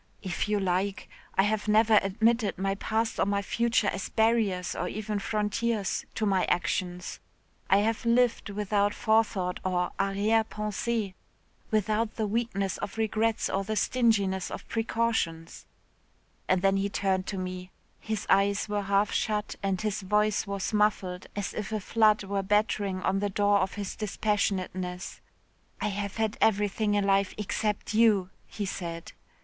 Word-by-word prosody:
'If 185 +2 -2
you 210 -1 +2
like. 190 +1 -1 0.3
I 190 - +4
have 215 +1 0
never 215 0 +5
admitted 220 +2 +1
my 195 +1 0
past 220 +3 -1
or - - +3
my 200 0 0
future 235 +1 +1
as 195 -1 -2
barriers 220 -6 +1
or 180 - -2
even 210 +1 -3
frontiers 210 0 -1
to 220 - 0
my 195 -3 +2
actions. 180 0 -2 0.5
I 195 +1 +5
have 225 +2 0
lived 235 -1 +2
without 205 0 0
forethought 210 -5 +1
or 180 -1 0
arrière 200 +3 +2
pensée 210 -1 -2 0.6
without 215 +1 0
the 220 - -1
weakness 205 -3 -1
of 205 - -5
regrets 220 0 +1
or 195 - -1
the 215 +2 -3
stinginess 205 -6 +1
of - - -7
precautions,' 225 -8 -1 0.8
and 185 0 +2
then 195 0 +4
he 200 +1 0
turned 190 -2 0
to 195 - -3
me 185 0 -5 0.3
his 220 -2 -3
eyes 200 +2 +3
were 205 -1 -1
half 200 +1 +1
shut 210 -1 -1
and 195 -2 0
his 215 -1 -2
voice 210 +2 +1
was 200 +1 -3
muffled 200 -4 +1
as 205 -1 -3
if 215 0 -4
a 215 - -1
flood 215 +1 +3
were 195 0 -1
battering 200 -2 0
on 195 +1 +1
the 205 0 0
door 205 +1 +3
of 190 0 -1
his 200 -2 -4
dispassionateness, 185 -4 -2 0.6
'I - - 0
have 200 0 -4
had 220 -1 -1
everything 210 0 +2
in 205 -1 +2
life 195 -1 +2
except 210 0 -2
you,' 210 -5 +4 0.2
he 205 - -4
said. 170 -3 -5
205 Hz, 155 wpm, -28 LUFS, 195-215 Hz, 0.8 s, never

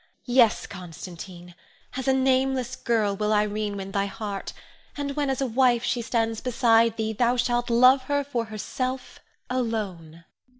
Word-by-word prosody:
Yes, 245 -3 +3
Constantine, 175 0 -10 0.4
as 260 +1 -4
a - - +5
nameless 260 -1 +1
girl 220 -5 0
will 210 +1 -1
Irene 210 -1 0
win 195 0 -6
thy 200 0 0
heart; 200 0 -5 0.5
and 280 -1 -3
when 290 -2 0
as 265 0 -1
a - - +2
wife 245 -1 +2
she 245 - 0
stands 225 -1 -1
beside 230 -2 +3
thee, 220 0 -1
thou 240 +3 +1
shalt 240 0 0
love 255 +3 +6
her 285 0 0
for 245 -5 -2
herself 255 +4 -5 0.3
alone. 200 -10 -3
230 Hz, 155 wpm, -25 LUFS, 205-255 Hz, 0.5 s, love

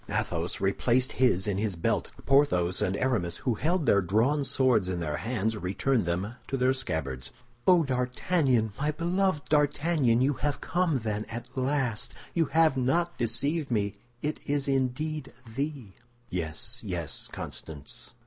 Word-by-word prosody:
Athos 85 0 -1
replaced 120 +6 +2
his 120 -8 +2
in 100 -2 -1
his 105 -3 -1
belt; 85 - 0 0.2
Porthos 115 -11 +3
and 95 +2 0
Aramis, 100 -10 0
who 125 - 0
held 160 - 0
their 100 -4 +5
drawn 115 - +2
swords 125 -8 +2
in 90 -2 -2
their 75 -4 -2
hands, 110 - -1
returned 105 +4 0
them 95 +8 -2
to 135 - -1
their 130 +1 +3
scabbards. 80 - -3 0.4
"Oh, 180 -3 +6
D'Artagnan, 125 - +1
my 150 +2 +1
beloved 175 0 0
D'Artagnan! 145 -4 +3
You 135 +3 +3
have 145 +1 -2
come, 175 -4 +1
then, 105 -1 -2
at 115 +1 -8
last! 130 -3 -1 0.2
You 165 -2 +2
have 160 -1 +3
not 170 +7 +1
deceived 140 +7 +1
me! 100 -4 0 0.3
It 150 +1 -2
is 145 -1 0
indeed 140 +3 -1 0.2
thee!" 135 -6 -4 0.4
"Yes, 80 -3 -3
yes, - - -4
Constance. 75 -3 -8
125 Hz, 150 wpm, -28 LUFS, 100-145 Hz, 0.4 s, Oh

